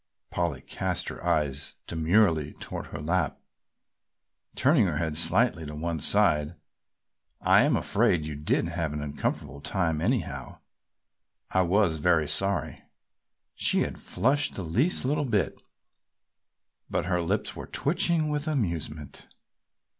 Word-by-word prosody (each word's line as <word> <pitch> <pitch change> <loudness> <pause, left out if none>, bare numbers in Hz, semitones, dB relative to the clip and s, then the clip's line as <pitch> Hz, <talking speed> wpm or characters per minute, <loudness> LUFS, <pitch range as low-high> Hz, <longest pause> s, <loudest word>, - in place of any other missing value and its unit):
Polly 85 -7 -2
cast - - -3
her - - -9
eyes 75 -2 0
demurely 80 -2 +2
toward - - -7
her 80 - -7
lap, 85 +5 -1 1.2
turning 130 - +4
her 75 -4 -1
head 80 -1 -2
slightly 85 +3 +3
to 75 0 -7
one 80 +1 -3
side, 75 -2 +3 0.8
"I - - +5
am - - +3
afraid 80 -3 +1
you 75 - -4
did 75 +1 0
have 75 - -2
an 75 - -4
uncomfortable 70 -1 -4
time 80 0 -1
anyhow. 90 - -2 0.9
I 95 - +3
was 90 -2 +2
very 80 -1 +2
sorry." 100 +5 0 0.7
She - - +2
had - - -3
flushed 135 +9 0
the 95 - -4
least 125 - +1
little 145 +2 +1
bit, 110 -7 -1 1.3
but - - -1
her 90 -1 0
lips 95 +5 -1
were - - -8
twitching 165 0 +1
with 150 +1 -2
amusement. 85 - -3
85 Hz, 130 wpm, -27 LUFS, 75-110 Hz, 1.3 s, I